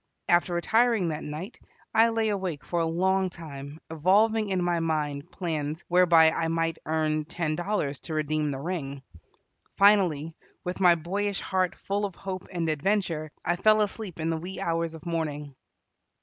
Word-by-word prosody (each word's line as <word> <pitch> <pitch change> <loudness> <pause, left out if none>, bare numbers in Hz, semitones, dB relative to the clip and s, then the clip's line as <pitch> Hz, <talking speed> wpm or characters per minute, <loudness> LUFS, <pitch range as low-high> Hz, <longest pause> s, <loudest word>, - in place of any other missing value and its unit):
After 175 0 +3
retiring 220 +1 +2
that 155 -1 -4
night, 155 +9 -7 0.3
I 225 +1 +5
lay 225 -1 0
awake 185 -8 -3
for 175 - -1
a 165 - +1
long 190 +3 +1
time 150 -3 -9
evolving 205 +7 +3
in 185 -2 0
my 175 -1 +1
mind 150 -3 -2
plans 155 -3 -3
whereby 170 -3 +6
I 165 - -1
might 165 0 -1
earn 155 -1 0
ten 160 -1 -2
dollars 175 -6 -2
to 160 - -6
redeem 155 0 0
the 135 - -3
ring. 140 -4 -4 0.7
Finally, 175 -7 +4 0.3
with 180 +1 -4
my 180 -2 +6
boyish 195 +5 -2
heart 185 -1 0
full 200 +1 -2
of 195 -3 -3
hope 190 -1 -6
and 170 -3 -2
adventure, 160 -1 0
I 175 - +2
fell 215 +3 +5
asleep 205 -4 -5
in 160 +1 0
the 165 - -1
wee 180 +4 -7
hours 165 -3 -1
of 160 - -12
morning. 150 -4 -3
170 Hz, 165 wpm, -27 LUFS, 155-190 Hz, 0.7 s, whereby